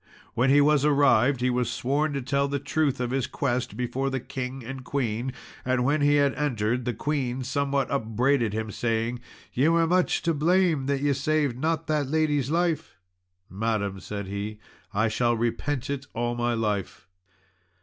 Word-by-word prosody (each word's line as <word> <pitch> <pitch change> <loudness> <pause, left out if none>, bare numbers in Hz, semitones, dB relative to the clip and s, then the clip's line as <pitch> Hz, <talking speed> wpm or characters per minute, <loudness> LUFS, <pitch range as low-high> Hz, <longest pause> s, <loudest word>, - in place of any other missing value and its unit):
When 125 +3 +2
he 145 +2 +6
was 145 -1 +4
arrived, 140 -3 +4
he 125 0 +2
was 125 -1 0
sworn 140 +6 0
to 140 -2 -3
tell 140 +2 +1
the 140 0 -1
truth 145 -1 0
of 125 -1 -2
his 130 -1 0
quest 125 -3 -2
before 125 +2 -1
the 135 0 -2
King 130 0 -6
and 130 +1 -6
Queen, 125 -2 -2 0.3
and 125 -1 +1
when 145 +3 +2
he 145 0 +4
had 140 -2 +3
entered 125 -4 -1
the 120 - -1
Queen 135 -4 -2
somewhat 140 +1 0
upbraided 120 -1 +1
him, 110 0 -3
saying, 115 +2 -1 0.3
"Ye 135 +5 +3
were 165 0 +4
much 180 +2 +1
to 170 - +2
blame 160 -2 +2
that 140 -1 0
ye 145 0 +2
saved 145 -1 0
not 160 +2 0
that 150 -3 0
lady's 150 -2 +1
life." 165 -1 0 0.5
"Madam," 100 -1 -2
said 100 +1 -5
he, 100 +2 -5 0.3
"I 110 +2 +1
shall 120 +2 +1
repent 120 +3 -1
it 140 -1 -4
all 120 +1 -1
my 120 0 0
life." 105 -6 -2
130 Hz, 175 wpm, -26 LUFS, 120-145 Hz, 0.5 s, he